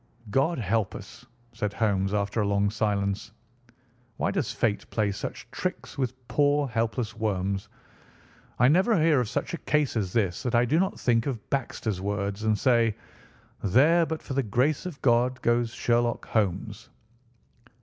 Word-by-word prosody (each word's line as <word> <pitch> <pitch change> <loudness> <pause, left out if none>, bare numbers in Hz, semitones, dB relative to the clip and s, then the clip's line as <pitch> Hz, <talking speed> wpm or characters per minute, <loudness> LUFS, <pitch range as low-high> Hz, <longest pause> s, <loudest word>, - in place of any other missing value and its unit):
"God 150 +8 +2
help 110 -2 0
us!" - - -11 0.3
said 105 -3 -3
Holmes 100 -3 +1
after 105 +1 0
a 105 - 0
long 100 0 +1
silence. 105 0 -1 0.8
"Why - - 0
does - - -1
fate 105 -2 -1
play 105 -3 0
such 100 - -6
tricks - - -4
with 130 -2 -4
poor, 145 0 +2
helpless 115 -1 -2
worms? 100 -3 -2 0.9
I 125 - +5
never 185 - +4
hear 155 -3 +4
of 120 -4 -1
such - - -3
a 170 - -3
case 150 -4 0
as 100 -5 -1
this 100 -6 0
that 120 -2 -1
I 120 +1 +4
do 155 +7 +2
not 190 - 0
think 115 0 +2
of 120 -6 -4
Baxter's 115 -7 -2
words, 100 +1 -2
and 110 -1 +2
say, 115 -4 +3 0.7
'There, 155 - +4
but 160 -1 -4
for 135 - -5
the 135 - +2
grace 130 - 0
of 165 -6 -8
God, 125 +1 +3
goes 120 0 +2
Sherlock 120 0 0
Holmes. 105 +1 -1
115 Hz, 160 wpm, -27 LUFS, 105-130 Hz, 0.9 s, I